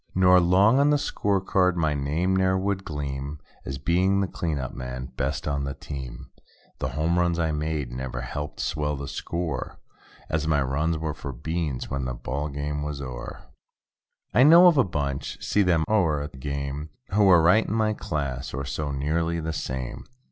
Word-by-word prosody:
Nor 90 0 +6
'long 95 +8 +5
on 140 +1 +4
the 150 - +4
score 100 -8 0
card 90 -1 +2
my 80 -3 +2
name 75 +7 0
ne'er 95 0 +3
would 95 0 -1
gleam. 70 -2 -4 0.3
As 65 - -4
being 90 +7 +2
the 100 - +2
"clean 80 -3 -2
up 65 -2 -4
man"—best 65 +2 -4
on 70 -1 -1
the 70 0 -4
team. 65 -4 -8 0.5
The - - -1
home 85 +3 +2
runs 85 -1 +2
I 80 -2 +1
made 75 -4 -2
never 65 0 -4
helped 75 +4 -5
swell 75 -1 -1
the 70 0 -6
score. 85 +2 -4 0.5
As 75 0 -1
my 75 -2 +3
runs 75 +5 0
were 80 -1 -3
for 70 -2 -6
"beans" 80 +1 -3
when 70 -1 -2
the 65 -1 -3
ball 70 +5 -3
game 75 +1 -3
was 75 -1 -4
o'er. 65 -3 -7 0.9
I - - +5
know 165 +6 +9
of 170 -5 +6
a - - +6
bunch—see 75 +4 -1
them 85 -4 +3
o'er 85 -9 +2
at 75 - -7
the 65 - -13
game. 70 +2 -4 0.2
Who 105 +1 +4
were 90 -3 +7
right 105 +7 +5
in - - -2
my 110 -1 +2
class, 70 - -3
or 70 +1 -3
so 70 +2 -3
nearly 80 +4 0
the 80 0 -3
same. 65 -3 -4
75 Hz, 185 wpm, -26 LUFS, 70-90 Hz, 0.9 s, know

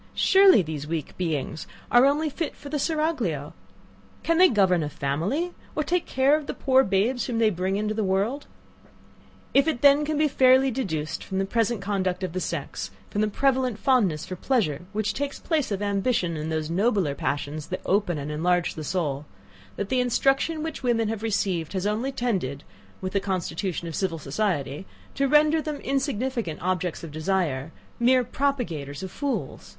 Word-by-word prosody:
Surely 380 - +6
these 155 -2 -5
weak 160 -2 -4
beings 160 -3 -3 0.2
are 245 +3 +7
only 300 +3 +1
fit 305 +2 -3
for 285 - -10
the 295 0 -2
seraglio! 270 - -1 0.7
Can 330 +1 +2
they 370 0 +8
govern 190 - +3
a 150 - -2
family, 170 - -1 0.2
or 305 - +1
take 350 +4 0
care 265 +3 +3
of 305 -2 -4
the - - -4
poor 265 -1 +4
babes 215 +5 +1
whom 240 -3 -2
they 225 -1 +3
bring 185 +1 -1
into 210 +1 -1
the 215 0 -1
world? 200 +9 0 1.1
If 275 - +5 0.2
then 280 0 +7
it 300 - -1
can 310 -1 0
be 305 0 +3
fairly 260 -1 +4
deduced 160 - -3
from 190 - -4
the 195 - +1
present 230 +1 0
conduct 190 -2 -1
of 180 -3 -3
the 185 - -1
sex, 145 - -4 0.2
from 210 - 0
the 215 - +2
prevalent 255 0 +1
fondness 215 - +2
for 185 - -6
pleasure, 180 - 0
which 215 0 -1
takes 285 0 -3
place 315 -5 -1
of 200 0 -2
ambition 200 -3 0
and 155 +1 -4
those 155 0 -2
nobler 195 -5 +1
passions 145 +2 -3
that 185 - -4
open 195 -4 +1
and 145 +1 -4
enlarge 175 +3 +1
the 155 - -6
soul; 150 -4 -2 0.5
that 200 -1 -4
the 260 - +2
instruction 270 +6 +1
which 320 - -5
women 230 -4 +1
have 220 -1 -3
received 195 -7 -1
has 190 0 -2
only 220 +6 0
tended, 190 - -2 0.4
with 185 0 -4
the 200 - +2
constitution 185 -2 -3
of 165 - -5
civil 175 -1 -1
society, 150 0 -2 0.3
to 275 0 +1
render 300 +2 +4
them 305 -1 -3
insignificant 260 - -2
objects 180 -2 -2
of 165 - -7
desire; 155 -3 -1 0.3
mere 250 +1 +4
propagators 225 - -2
of 190 - -6
fools! 285 -2 -4
205 Hz, 180 wpm, -25 LUFS, 170-265 Hz, 1.1 s, they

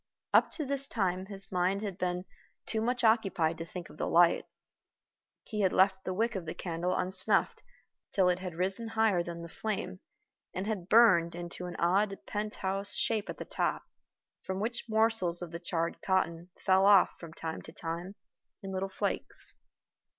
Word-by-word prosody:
Up - - +6
to 310 - -2
this 275 0 0
time 190 -5 -1
his 195 -1 -2
mind 185 +2 +1
had 195 -3 -5
been 180 0 -1 0.4
too 220 - -1
much 245 +2 0
occupied 195 -8 +2
to 165 - -4
think 175 0 -7
of - - -15
the - - -2
light. 170 0 +4 1.0
He 210 -1 -3
had 190 -2 +2
left 190 0 +3
the 185 - -2
wick 230 +4 +1
of 185 -5 -5
the 160 - -4
candle 175 +1 -2
unsnuffed 190 +2 +2 0.5
till 190 -2 +3
it 180 0 +2
had 180 -3 -6
risen 190 +6 +1
higher 220 -5 +2
than 170 0 -6
the - - -7
flame, 190 - -4 0.6
and 185 - -2
had 200 -4 -3
burned 190 -8 +6
into 175 +1 -6
an 175 - -7
odd 195 +3 +2
pent 210 0 -3
house 195 +1 -2
shape 220 -2 0
at - - -5
the - - -6
top, - - -1 0.6
from 190 0 -4
which 230 +3 -2
morsels 220 -6 +2
of 170 - -7
the 170 - -5
charred 170 -1 -2
cotton 180 -2 0
fell 190 +1 +4
off 200 -3 +7
from 165 -2 -9
time 160 -1 -5
to - - -11
time 170 +4 -5 0.5
in 195 - -5
little 190 +1 -2
flakes. 190 - -2
190 Hz, 180 wpm, -31 LUFS, 175-210 Hz, 1.0 s, off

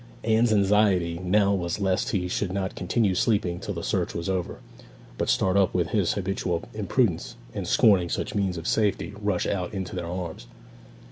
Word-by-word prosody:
Anne's 115 +1 +3
anxiety 100 -4 +3
now 100 +2 +2
was 85 0 -2
lest 95 -2 0
he 90 -3 -1
should 90 +1 -2
not 95 0 -2
continue 95 +2 0
sleeping 90 -3 +1
till - - -5
the - - -5
search - - -1
was 85 - -3
over, 90 -2 -2 0.6
but - - 0
start 95 0 +2
up 100 -1 +3
with 85 -2 +1
his 100 -6 +1
habitual 95 -3 -2
imprudence, 105 -2 0 0.2
and - - -4
scorning 95 -5 +4
such - - -3
means 95 -4 0
of 80 - -7
safety, 105 -1 0
rush 105 -3 0
out 95 0 -2
into 95 -2 -4
their 90 -2 -4
arms. 85 -7 -5
95 Hz, 180 wpm, -26 LUFS, 90-105 Hz, 0.6 s, scorning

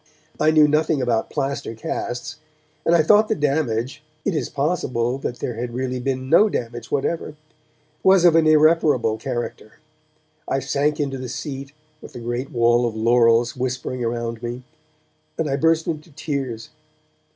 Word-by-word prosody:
I 155 - +4
knew 155 -1 +6
nothing 155 0 +1
about 120 -3 0
plaster 140 -4 -3
casts, 120 +5 -4 0.5
and 170 - +5
I 165 - +4
thought 210 +6 +5
the 220 - 0
damage 140 - -1 0.2
(it 200 - +1
is 155 - -2
possible 135 -5 -1
that 125 -2 -4
there 120 - -3
had 120 +1 -5
really 130 0 -2
been 130 0 -2
no 205 +9 +5
damage 120 - -4
whatever) 150 +2 -2 0.7
was 190 -2 +5
of 170 -2 +6
an 165 -1 +4
irreparable 155 -7 +4
character. 120 -3 -5 0.8
I - - +1
sank 145 +2 0
into 135 -2 -2
the 130 -1 -6
seat, 135 +1 -6 0.3
with - - -12
the - - -7
great 120 +3 -3
wall 120 0 +3
of 115 - -5
laurels 115 +1 +3
whispering 130 0 -3
around 115 -1 -3
me, 120 +1 -5 0.7
and 160 - -1
I 135 - 0
burst 160 +2 +2
into 155 0 -4
tears. 140 -7 -4
135 Hz, 160 wpm, -22 LUFS, 120-155 Hz, 0.8 s, knew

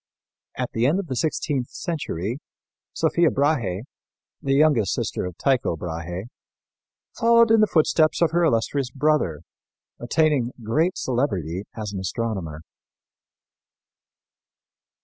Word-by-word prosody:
At - - -2
the 115 +2 +1
end 155 +6 +2
of 200 - -3
the 135 -6 -4
sixteenth 140 -2 -1
century, 125 - -4 0.5
Sophia 170 -2 +2
Brahe, 120 - 0 0.6
the 135 0 +1
youngest 140 - +3
sister - - -2
of 90 - -9
Tycho 130 -10 +1
Brahe, 85 +2 -5 0.9
following 230 0 +4
in 225 - +5
the 215 - +5
footsteps 155 -2 +3
of 170 - +3
her 170 +1 +2
illustrious 135 -1 +1
brother, 140 - 0 0.6
attained 135 -1 +1
great 155 +11 +1
celebrity 100 - -1
as 105 -2 -4
an 95 - -3
astronomer. 95 -5 -3
130 Hz, 115 wpm, -23 LUFS, 100-155 Hz, 0.9 s, in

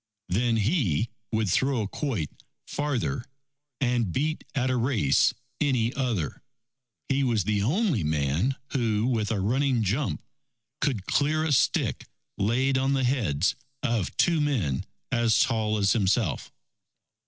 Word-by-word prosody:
Then 115 +5 +1
he 110 - +1 0.2
would 110 -1 +1
throw 130 +6 +1
a - - -3
quoit 105 - -3 0.3
farther, 140 -3 -2 0.6
and 120 -7 +1
beat 155 - -1
at 130 -1 +1
a - - +1
race 115 - +3 0.3
any 125 -5 +1
other. 120 - -2 0.7
He 135 +1 +1
was 115 -6 +1
the 105 +1 0
only 155 - +1
man, 75 - 0 0.2
who 115 -4 +1
with 115 -4 0
a 110 - 0
running 125 +4 +1
jump, 115 +9 -1 0.6
could 125 -9 -1
clear 155 +2 +1
a 160 - 0
stick 135 - +1 0.3
laid 130 +6 +2
on 135 +1 +1
the 135 -1 +1
heads 100 - +1 0.3
of 115 -8 -1
two 165 -3 +3
men 110 - 0 0.3
as 120 -2 +3
tall 110 -3 +1
as 100 -1 +3
himself. 105 -3 0
120 Hz, 135 wpm, -27 LUFS, 105-135 Hz, 0.7 s, race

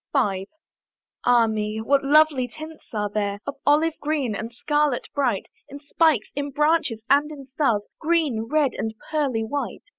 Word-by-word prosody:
V. 195 -6 0 0.8
Ah 245 -1 +5
me! 215 -1 -2
what 275 +5 +2
lovely 290 -2 +4
tints 310 +5 -11
are 210 -2 -1
there! 205 -1 -2
Of 280 - -5
olive 305 +3 +4
green 290 -6 -1
and 220 +3 -5
scarlet 295 +1 0
bright, 275 -4 0 0.2
In 280 +1 -9
spikes, 290 -4 +1
in 285 0 -2
branches, 295 -5 +1
and 285 +2 +3
in 285 -3 -9
stars, 260 -6 0 0.2
Green, 305 -9 +1
red, 300 -3 +2
and 220 0 -4 0.2
pearly 275 -8 0
white. 280 +6 -4
275 Hz, 155 wpm, -24 LUFS, 225-300 Hz, 0.8 s, Ah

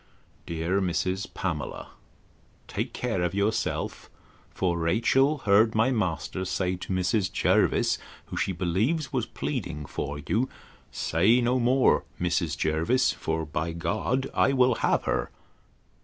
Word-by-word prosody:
'Dear 85 +4 0
Mrs. 95 +1 -1
Pamela, 80 -7 -4 0.8
Take - - -3
care 115 -7 -2
of 90 +1 -1
yourself; 100 +2 -1 0.4
for 90 -2 -1
Rachel 120 - +3
heard 110 +2 +4
my 115 +4 +3
master 90 - -1
say 90 0 -1
to 90 - -7
Mrs. 95 +1 +1
Jervis, - - +2 0.3
who, - - -8
she - - 0
believes, 100 - 0
was 125 -3 0
pleading 85 - -4
for 70 +1 -4
you, 115 - -1 0.4
Say 95 +10 +3
no 125 +1 +2
more, 125 +2 +3 0.2
Mrs. 85 -4 0
Jervis; 85 +12 +2
for 80 0 -3
by 80 +2 -3
G—d 110 +10 -1
I 135 - +3
will 130 -1 +4
have - - +2
her! - - -1
95 Hz, 130 wpm, -27 LUFS, 85-120 Hz, 0.8 s, heard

